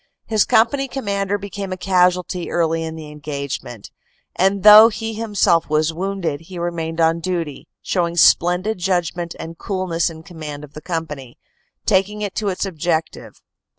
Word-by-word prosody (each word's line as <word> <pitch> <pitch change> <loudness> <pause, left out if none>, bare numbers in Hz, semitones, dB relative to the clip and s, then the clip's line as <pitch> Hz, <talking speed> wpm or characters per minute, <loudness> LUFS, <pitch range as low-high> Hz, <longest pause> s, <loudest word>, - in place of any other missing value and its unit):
His 215 -2 +2
company 270 +5 +2
com 270 -2 -6
mander 200 0 0
became 200 -1 -6
a 185 - -3
casualty 180 -1 +1
early 165 -1 0
in 160 0 -5
the 155 -2 -9
engagement, 140 -6 -6 0.4
and 195 +1 +1
though 215 +2 +10
he 225 0 -5
himself 205 -7 +1
was 155 +1 +1
wounded, 180 -4 -3
he 180 +2 -10
remained 170 -1 -3
on 165 0 +3
duty, 165 -5 -4 0.2
showing 170 -2 -1
splen 175 +2 +5
did 220 -2 -2
judgment 175 -2 -1
and 165 0 -8
coolness 185 -5 -1
in 160 -1 -11
command 155 -5 -8
of 145 - -12
the 155 - -9
company, 150 -8 -5 0.5
taking 210 +3 +1
it 200 -2 -3
to 210 - -2
its 185 +1 -2
objective. 165 -3 -3
175 Hz, 160 wpm, -20 LUFS, 160-195 Hz, 0.5 s, though